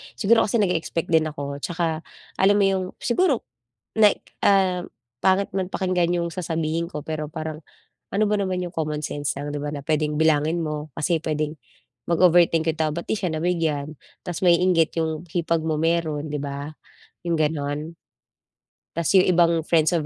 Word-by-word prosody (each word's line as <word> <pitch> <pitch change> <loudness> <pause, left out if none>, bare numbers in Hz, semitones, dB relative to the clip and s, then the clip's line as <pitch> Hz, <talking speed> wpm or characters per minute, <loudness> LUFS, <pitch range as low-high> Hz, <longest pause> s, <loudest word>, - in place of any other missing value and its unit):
Siguro 225 +2 +4
kasi 225 +3 +1
nag-e-expect 170 -2 -1
din 160 -1 +4
ako 140 -2 -5
'tsaka 165 0 -2 0.4
alam 200 +1 +5
mo 205 - +3
yung 190 -1 +1 0.2
siguro 275 +1 +2 0.5
like, 215 -2 +3
ah, 190 -3 +3 0.4
pangit 190 +1 +3
man 190 -1 -2
pakinggan 180 -2 +1
yung 170 - -1
sasabihin 165 -1 -2
ko 150 - -5
pero 155 -1 -3
parang, 155 -1 -5 0.5
ano 205 +2 +2
ba 210 - +2
naman 185 -2 -1
'yung 175 - -5
common 150 -1 -2
sense 145 0 -2
lang 145 +1 -4
'di - - -2
ba 145 - -4
na 145 -2 -6
puwedeng 150 0 0
bilangin 160 +1 +2
mo 150 -1 -4
kasi 165 +1 +1
puwedeng 155 -1 -2 0.5
mag-overthink 170 -1 +4
yung 160 - -12
tao 155 -1 +1
ba't 170 - -3
'di - - 0
siya 180 -4 -1
nabigyan? 155 -3 -1 0.3
Tapos 175 -2 -4
mainggit 175 -2 +4
'yong 160 +1 -2
hipag 165 -2 0
mo 160 -1 0
mayro'n, 160 -2 0
'di 150 - -2
ba? 140 +1 -5 0.6
'Yong 170 -1 +1
gano'n. 150 +1 -2 1.0
Tas 170 -1 0
yung 185 - +6
ibang 170 -3 +3
friends 160 -2 +3
of 165 -4 0
165 Hz, 170 wpm, -24 LUFS, 155-180 Hz, 1.0 s, yung